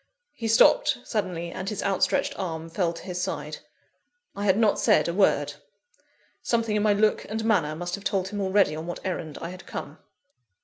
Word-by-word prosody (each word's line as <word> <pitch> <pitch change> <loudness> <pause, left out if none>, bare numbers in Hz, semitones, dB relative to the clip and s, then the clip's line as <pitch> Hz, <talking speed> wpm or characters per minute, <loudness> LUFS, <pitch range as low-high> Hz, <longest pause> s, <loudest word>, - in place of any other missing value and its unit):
He 230 - -4
stopped 245 - +5
suddenly, 180 -6 -3
and 185 +2 -4
his 210 - -3
outstretched 195 -1 +1
arm 165 -3 -4
fell 175 -1 0
to 170 - -10
his 180 -1 -4
side. 185 - -4 0.8
I 200 - -3
had 190 -1 +4
not 220 -2 +3
said - - +4
a 170 - -1
word. 195 +1 +2 0.9
Something 230 -2 0
in 210 - +2
my 210 0 +4
look 210 +1 +2
and 220 +1 -3
manner 170 -9 +2
must 175 +2 -5
have 200 - -4
told 190 -2 0
him 205 0 -4
already 190 -5 +3
on 160 +2 -6
what 175 - -6
errand 160 -5 -4
I 170 - -4
had 185 +1 -11
come. - - -7
190 Hz, 190 wpm, -26 LUFS, 175-210 Hz, 0.9 s, stopped